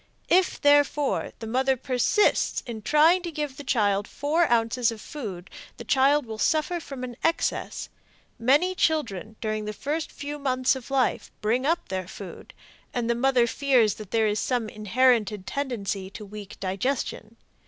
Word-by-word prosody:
If, 370 Hz, +1 st, +3 dB
therefore, 290 Hz, 0 st, +3 dB
the 225 Hz, -, -7 dB
mother 260 Hz, +3 st, +1 dB
persists 255 Hz, -, +1 dB
in 230 Hz, -3 st, -6 dB
trying 310 Hz, -, +4 dB
to 345 Hz, -1 st, -5 dB
give 295 Hz, -3 st, -4 dB
the 285 Hz, -, -7 dB
child 205 Hz, -6 st, +1 dB
four 305 Hz, +1 st, 0 dB
ounces 230 Hz, +1 st, +2 dB
of 225 Hz, -, -8 dB
food, 205 Hz, -9 st, -7 dB, 0.3 s
the -, -, -7 dB
child 275 Hz, +1 st, +3 dB
will 220 Hz, -1 st, -7 dB
suffer 320 Hz, +6 st, +1 dB
from 275 Hz, -5 st, -8 dB
an 245 Hz, -1 st, -6 dB
excess. 330 Hz, 0 st, -1 dB, 0.5 s
Many 285 Hz, +10 st, +3 dB
children 230 Hz, -, -1 dB
during 215 Hz, -1 st, -2 dB
the 210 Hz, -, -4 dB
first 295 Hz, +8 st, -3 dB
few 290 Hz, +1 st, -6 dB
mouths 255 Hz, -1 st, +1 dB
of 260 Hz, -1 st, -9 dB
life 270 Hz, -3 st, 0 dB
bring 240 Hz, +6 st, 0 dB
up 335 Hz, -5 st, 0 dB
their 185 Hz, -1 st, -3 dB
food, 190 Hz, -1 st, -10 dB, 0.4 s
and 235 Hz, -1 st, 0 dB
the -, -, +3 dB
mother 250 Hz, 0 st, +3 dB
fears 245 Hz, -3 st, +2 dB
that 210 Hz, -, -10 dB
there 225 Hz, 0 st, +2 dB
is 210 Hz, 0 st, +1 dB
some 240 Hz, -4 st, -1 dB
inherited 215 Hz, -2 st, +1 dB
tendency 210 Hz, -8 st, -3 dB
to 210 Hz, +2 st, -9 dB
weak 205 Hz, 0 st, -10 dB
digestion. 215 Hz, +3 st, -3 dB
250 Hz, 165 wpm, -26 LUFS, 215-285 Hz, 0.5 s, trying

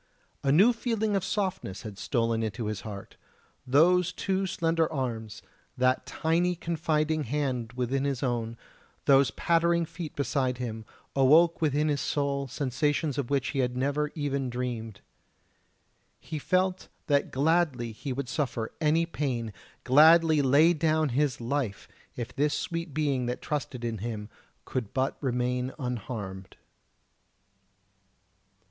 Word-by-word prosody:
A 135 Hz, -, +2 dB
new 200 Hz, -, +6 dB
feeling 225 Hz, -3 st, -1 dB
of 195 Hz, -, 0 dB
softness 190 Hz, -, -2 dB
had 105 Hz, -3 st, -8 dB
stolen 115 Hz, +3 st, 0 dB
into 110 Hz, +1 st, -3 dB
his 105 Hz, -2 st, -3 dB
heart; 100 Hz, -3 st, -9 dB, 0.5 s
those 175 Hz, +6 st, +4 dB
two 190 Hz, +1 st, -1 dB
slender 165 Hz, -3 st, 0 dB
arms, 115 Hz, -7 st, -4 dB, 0.3 s
that 130 Hz, +1 st, +2 dB
tiny 175 Hz, +3 st, +1 dB
confiding 155 Hz, -2 st, 0 dB
hand 125 Hz, -3 st, -2 dB
within 125 Hz, +2 st, -1 dB
his 140 Hz, -1 st, -1 dB
own, 115 Hz, -2 st, -2 dB, 0.5 s
those 135 Hz, -2 st, +5 dB
pattering 170 Hz, +6 st, +2 dB
feet 165 Hz, -1 st, -7 dB
beside 135 Hz, -3 st, 0 dB
him, 115 Hz, -3 st, -5 dB, 0.3 s
awoke 155 Hz, +6 st, +5 dB
within 150 Hz, 0 st, +2 dB
his 145 Hz, -2 st, 0 dB
soul 140 Hz, -1 st, -1 dB
sensations 145 Hz, +3 st, -1 dB
of 130 Hz, -, -3 dB
which 140 Hz, -2 st, 0 dB
he 140 Hz, -, -2 dB
had 125 Hz, -1 st, 0 dB
never 145 Hz, +3 st, 0 dB
even 140 Hz, -4 st, -1 dB
dreamed. 120 Hz, -4 st, -4 dB, 1.2 s
He 155 Hz, -1 st, -6 dB
felt 185 Hz, +4 st, 0 dB, 0.2 s
that 145 Hz, -1 st, +2 dB
gladly 140 Hz, -6 st, +1 dB, 0.2 s
would 130 Hz, +1 st, -3 dB
he -, -, -6 dB
suffer 125 Hz, -7 st, -2 dB
any 160 Hz, +2 st, +3 dB
pain, 125 Hz, -9 st, -3 dB, 0.3 s
gladly 155 Hz, +3 st, +6 dB
lay 145 Hz, +6 st, +5 dB
down 155 Hz, -1 st, +1 dB
his 135 Hz, +1 st, 0 dB
life, 120 Hz, -4 st, -2 dB, 0.3 s
if 120 Hz, -2 st, -6 dB
this 145 Hz, +2 st, +1 dB
sweet 165 Hz, -2 st, -3 dB
being 140 Hz, -4 st, 0 dB
that 125 Hz, -, -2 dB
trusted 125 Hz, -4 st, -4 dB
in 115 Hz, -2 st, -3 dB
him 105 Hz, -1 st, -5 dB, 0.4 s
could 120 Hz, -5 st, -4 dB
but 130 Hz, 0 st, 0 dB
remain 125 Hz, 0 st, -1 dB
unharmed. 110 Hz, -7 st, -5 dB
140 Hz, 135 wpm, -28 LUFS, 125-160 Hz, 1.2 s, new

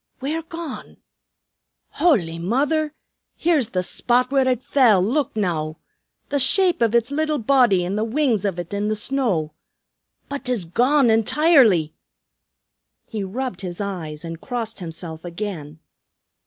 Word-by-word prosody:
Where 300 Hz, +5 st, -2 dB
gone? 330 Hz, -3 st, -8 dB, 0.9 s
Howly 175 Hz, -, +1 dB
Mither! 295 Hz, -, 0 dB, 0.4 s
Here's 310 Hz, -9 st, +1 dB
the 185 Hz, -4 st, -1 dB
spot 245 Hz, +6 st, 0 dB
where 270 Hz, -2 st, +3 dB
ut 255 Hz, -1 st, 0 dB
fell, 240 Hz, -8 st, +4 dB
look 250 Hz, +10 st, 0 dB
now! 160 Hz, -6 st, -2 dB, 0.5 s
The 285 Hz, -, 0 dB
shape 360 Hz, +5 st, +3 dB
of 230 Hz, 0 st, +2 dB
uts 235 Hz, +3 st, +2 dB
little 310 Hz, +1 st, 0 dB
body 235 Hz, -7 st, +3 dB
and 190 Hz, +3 st, -2 dB
the -, -, +1 dB
wings 230 Hz, -3 st, +1 dB
of 195 Hz, -4 st, -1 dB
ut 175 Hz, +2 st, -6 dB
in 205 Hz, +1 st, -1 dB
the 215 Hz, -, 0 dB
snow. 210 Hz, -, -1 dB, 0.7 s
But 280 Hz, 0 st, -6 dB
'tis 245 Hz, -8 st, -1 dB
gone 250 Hz, -, +3 dB
intirely!" 225 Hz, -, +4 dB, 1.1 s
He 215 Hz, -3 st, -5 dB
rubbed 200 Hz, 0 st, -4 dB
his 175 Hz, -2 st, -6 dB
eyes 170 Hz, -6 st, -5 dB
and 165 Hz, 0 st, -7 dB
crossed 235 Hz, -4 st, -4 dB
himself 165 Hz, -2 st, -7 dB
again. 170 Hz, -4 st, -6 dB
225 Hz, 140 wpm, -22 LUFS, 180-275 Hz, 1.1 s, fell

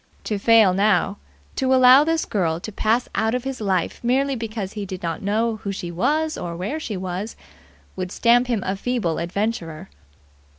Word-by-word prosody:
To 210 Hz, -2 st, -2 dB
fail 220 Hz, -3 st, +5 dB
now, 205 Hz, +1 st, +2 dB, 0.4 s
to 265 Hz, -1 st, +2 dB
allow 255 Hz, +2 st, +7 dB
this 325 Hz, +1 st, 0 dB
girl 170 Hz, -5 st, -1 dB
to 215 Hz, -, -6 dB
pass 225 Hz, +4 st, 0 dB
out 220 Hz, +2 st, 0 dB
of 250 Hz, -, -2 dB
his 270 Hz, -3 st, -5 dB
life 190 Hz, -1 st, -1 dB
merely 270 Hz, +3 st, +1 dB
because 215 Hz, -4 st, -5 dB
he 210 Hz, -, -5 dB
did 185 Hz, -2 st, -7 dB
not 165 Hz, -1 st, -3 dB
know 220 Hz, +3 st, 0 dB
who 200 Hz, -1 st, -5 dB
she 175 Hz, -3 st, -5 dB
was 310 Hz, -, 0 dB
or 170 Hz, -1 st, -5 dB
where 205 Hz, -, -3 dB
she 215 Hz, -10 st, -5 dB
was, 185 Hz, +3 st, -5 dB, 0.6 s
would 185 Hz, -1 st, -4 dB
stamp 245 Hz, +1 st, +3 dB
him 230 Hz, -6 st, -1 dB
a 190 Hz, -, -1 dB
feeble 210 Hz, -6 st, -2 dB
adventurer. 175 Hz, -2 st, -3 dB
215 Hz, 180 wpm, -22 LUFS, 185-245 Hz, 0.6 s, allow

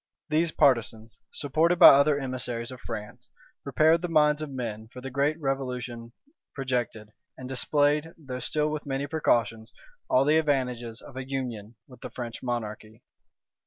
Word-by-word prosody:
These 160 Hz, +2 st, +2 dB
partisans, 115 Hz, -7 st, +1 dB
supported 160 Hz, +5 st, +1 dB
by -, -, +11 dB
other 140 Hz, +1 st, +5 dB
emissaries 125 Hz, -3 st, -4 dB
of 130 Hz, -1 st, -10 dB
France, 105 Hz, 0 st, -8 dB, 0.3 s
prepared 160 Hz, +2 st, +3 dB
the 175 Hz, -, -2 dB
minds 150 Hz, -2 st, +3 dB
of 155 Hz, -, -4 dB
men 115 Hz, -5 st, -5 dB
for 125 Hz, -, -11 dB
the 135 Hz, +1 st, -7 dB
great 145 Hz, +4 st, 0 dB
revolution 125 Hz, -4 st, -4 dB, 0.4 s
projected, 120 Hz, -5 st, -3 dB, 0.3 s
and 130 Hz, -, -8 dB
displayed, 145 Hz, +4 st, +1 dB
though 135 Hz, -5 st, -7 dB
still 150 Hz, +3 st, 0 dB
with 150 Hz, -1 st, -5 dB
many 135 Hz, +1 st, -2 dB
precautions, 115 Hz, -7 st, 0 dB, 0.4 s
all 130 Hz, +2 st, +4 dB
the 155 Hz, +2 st, +4 dB
advantages 125 Hz, -6 st, -1 dB
of 130 Hz, -, -12 dB
a 130 Hz, 0 st, -6 dB
union 120 Hz, -5 st, -5 dB
with 125 Hz, -, -16 dB
the -, -, -6 dB
French 120 Hz, -2 st, -7 dB
monarchy. 115 Hz, -1 st, -5 dB
130 Hz, 155 wpm, -27 LUFS, 120-150 Hz, 0.4 s, by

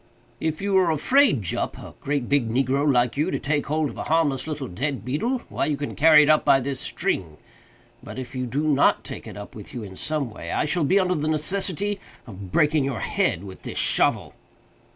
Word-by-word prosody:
"If 160 Hz, +3 st, -2 dB
you 200 Hz, -1 st, 0 dB
are 180 Hz, -2 st, +2 dB
afraid, 165 Hz, -, +3 dB
Jup, 85 Hz, -, -3 dB
a -, -, -10 dB
great 140 Hz, -3 st, -2 dB
big 140 Hz, -5 st, +1 dB
negro 135 Hz, +4 st, +1 dB
like 120 Hz, -1 st, +1 dB
you, 155 Hz, +5 st, +1 dB
to -, -, -1 dB
take 145 Hz, +1 st, -1 dB
hold 155 Hz, 0 st, 0 dB
of -, -, -13 dB
a -, -, -4 dB
harmless 155 Hz, -4 st, +1 dB
little 150 Hz, -4 st, -4 dB
dead 130 Hz, +5 st, -3 dB
beetle, 230 Hz, -, -1 dB
why -, -, -2 dB
you 150 Hz, -2 st, -1 dB
can 145 Hz, 0 st, -5 dB
carry 155 Hz, 0 st, +7 dB
it -, -, +1 dB
up 155 Hz, -, +4 dB
by 135 Hz, -, +5 dB
this 135 Hz, 0 st, -3 dB
string—but, 80 Hz, +6 st, -6 dB
if 130 Hz, 0 st, -7 dB
you 130 Hz, -1 st, -3 dB
do 140 Hz, +6 st, -2 dB
not 145 Hz, -2 st, +3 dB
take -, -, -7 dB
it -, -, -9 dB
up 105 Hz, -, -9 dB
with 105 Hz, +2 st, -11 dB
you 120 Hz, -, -5 dB
in 95 Hz, -2 st, -9 dB
some 145 Hz, +1 st, -2 dB
way, 85 Hz, -5 st, -7 dB
I -, -, 0 dB
shall 150 Hz, +1 st, +1 dB
be 190 Hz, +7 st, +4 dB
under 185 Hz, -1 st, +1 dB
the 155 Hz, -2 st, -2 dB
necessity 190 Hz, +5 st, 0 dB, 0.3 s
of 100 Hz, -5 st, -10 dB
breaking 150 Hz, -, +3 dB
your 135 Hz, -6 st, -3 dB
head 85 Hz, -, 0 dB
with 95 Hz, -2 st, -10 dB
this -, -, -7 dB
shovel." -, -, +2 dB
145 Hz, 215 wpm, -24 LUFS, 125-155 Hz, 0.3 s, carry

